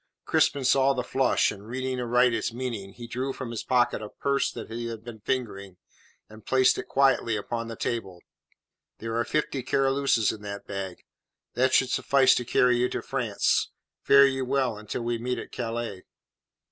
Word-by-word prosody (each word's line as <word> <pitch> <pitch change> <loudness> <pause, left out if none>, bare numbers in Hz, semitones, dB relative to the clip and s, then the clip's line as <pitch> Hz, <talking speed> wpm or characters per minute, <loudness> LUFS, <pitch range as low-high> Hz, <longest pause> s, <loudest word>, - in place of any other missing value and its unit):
Crispin 140 -2 +2
saw 135 +1 +4
the 125 -2 -2
flush, 130 +1 +2
and 100 0 -11
reading 130 +1 -3
aright 125 0 +3
its 115 - -1
meaning, 115 -5 -5
he 120 - -9
drew 130 +3 -3
from 130 -3 -6
his 115 - -4
pocket 120 -3 +1
a 105 - -7
purse 140 +4 0
that - - -8
he 115 +1 -4
had 115 -1 -7
been 115 -2 -9
fingering, 100 -6 -4 0.5
and 110 0 -14
placed 130 -1 +3
it - - -6
quietly 135 -4 +2
upon 115 +3 -4
the 115 - -6
table. 100 -7 -4 0.8
"There 115 0 -5
are 115 - +1
fifty 145 0 -1
Caroluses 135 -3 +2
in 105 - -10
that 100 -1 -7
bag. 95 -2 -6 0.5
That 130 +1 +2
should 130 -1 +3
suffice 135 -2 +4
to 125 - -1
carry 125 +1 +3
you 125 +1 +1
to - - -4
France. - - 0 0.3
Fare 140 0 +7
you 135 -1 0
well 130 -3 0
until 105 +3 -5
we 120 0 -1
meet 125 +2 -2
at - - -7
Calais." 115 -5 -4
120 Hz, 185 wpm, -26 LUFS, 110-130 Hz, 0.8 s, Fare